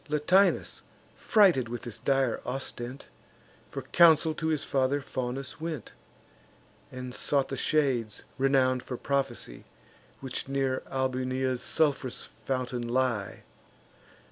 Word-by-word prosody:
Latinus, 160 +7 +2 0.3
frighted 180 - +4
with 120 0 -5
this 120 -3 -6
dire 135 -3 +1
ostent, 125 0 -5 0.6
For - - -6
counsel 160 -2 +5
to 160 +1 -3
his 155 -3 0
father 135 +1 +1
Faunus 135 +2 -5
went, 160 -8 -5 1.0
And 125 -1 -7
sought 140 0 0
the 135 - -3
shades 130 -8 0 0.2
renown'd 130 -1 +3
for 125 - -6
prophecy 135 - -2 0.6
Which 130 -1 -5
near 135 -1 0
Albunea's 130 -1 -1
sulph'rous 145 -5 0
fountain 125 -2 -4
lie. 120 -5 -1
130 Hz, 110 wpm, -29 LUFS, 125-145 Hz, 1.0 s, counsel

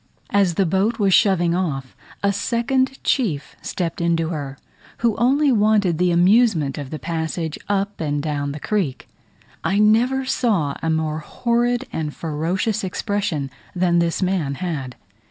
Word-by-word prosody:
As 195 -4 +3
the 195 - +2
boat 195 +7 +1
was 200 -4 +2
shoving 175 -5 +4
off, 140 -8 -2 0.3
a 200 0 +3
second 260 +5 0
chief 175 - 0
stepped 170 -2 -3
into 165 -1 +1
her, 145 -4 -5 0.5
who 225 -3 +3
only 275 +4 +3
wanted 205 -6 +3
the 180 0 +3
amusement 175 - +3
of 140 -2 -6
the 155 - -5
passage 160 +1 -3
up 200 -1 -1
and 145 -2 -1
down 145 -1 -2
the 150 - -6
creek. 175 -6 -2 0.6
I 195 - +1
never 235 +6 +3
saw 205 - +1
a 165 - -1
more 160 -1 0
horrid 240 +8 0
and 150 -2 -3
ferocious 175 +7 -1
expression 190 -6 -2 0.2
than 175 -1 +2
this 170 +2 0
man 175 -7 0
had. 140 -8 -4
180 Hz, 150 wpm, -21 LUFS, 155-210 Hz, 0.6 s, shoving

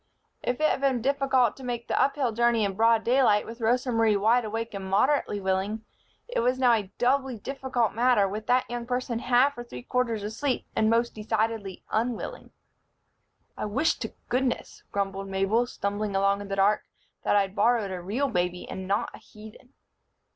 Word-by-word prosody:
If 245 +2 -2
it 310 - +4
had 270 - 0
been 270 -3 +2
difficult 265 -4 +2
to 265 - -11
make 240 -2 -4
the - - +1
uphill 275 -3 +1
journey 235 -1 +2
in 195 - -2
broad 225 +2 +3
daylight 240 -4 +3
with 230 +1 -9
Rosa 245 +3 +1
Marie 225 -2 +3
wide 230 +5 +3
awake 225 +1 -4
and 195 -1 -5
moderately 210 +1 +2
willing, 195 +3 -1 0.4
it - - -2
was 250 +2 +1
now 250 -2 +4
a 205 -4 -1
doubly 260 0 +1
difficult 260 -2 -2
matter 235 -3 +3
with 210 +2 -6
that 250 +1 +2
young 240 0 -5
person 250 -2 -2
half 255 +4 +3
or - - -4
three 125 - -9
quarters 235 - -1
asleep 245 +6 -2
and 220 - +3
most 235 +1 +2
decidedly 215 -2 -2
unwilling. 230 +1 -2 1.1
"I - - -4
wish 260 +10 +1
to - - -6
goodness," 255 0 -2
grumbled 195 -1 -2
Mabel, 195 +5 +1
stumbling 205 -2 -3
along 200 +1 +2
in 205 - -7
the 195 - -3
dark, 200 +2 +3 0.4
"that - - +1
I'd 195 -1 +1
borrowed 215 -1 +2
a 180 -1 -5
real 225 +11 -1
baby 180 -5 -2
and 190 0 -6
not 200 +2 0
a - - -11
heathen." 220 +4 -15
225 Hz, 185 wpm, -27 LUFS, 205-250 Hz, 1.1 s, it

